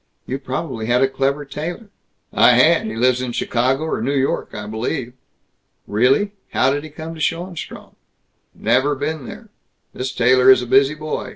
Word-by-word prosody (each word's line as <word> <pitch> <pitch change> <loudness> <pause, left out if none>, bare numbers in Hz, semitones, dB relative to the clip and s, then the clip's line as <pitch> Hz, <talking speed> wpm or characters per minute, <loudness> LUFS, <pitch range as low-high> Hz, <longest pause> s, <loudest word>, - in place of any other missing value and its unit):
You 135 +2 -4
probably 130 -3 -4
had 125 +2 +3
a - - +4
clever 135 +2 -1
tailor." 175 +9 -6 0.4
"I - - +6
had. - - +4
He 110 - -5
lives 125 +2 +2
in 125 -2 -4
Chicago 130 +6 0
or 160 -8 -2
New 135 +5 -1
York, 135 0 0
I 105 - -7
believe." 120 +4 -4 0.7
"Really? 130 - +2 0.2
How 130 - +3
did 145 +1 -3
he 155 - -8
come 160 +2 -8
to 160 - -9
Schoenstrom?" 170 +2 -4 0.6
"Never 130 +6 +1
been 145 0 -4
there. - - -10 0.4
This 130 +1 -4
tailor 125 +1 +4
is 130 -1 +6
a - - -4
busy 135 +4 +3
boy. 155 0 -5
135 Hz, 175 wpm, -20 LUFS, 125-150 Hz, 0.7 s, I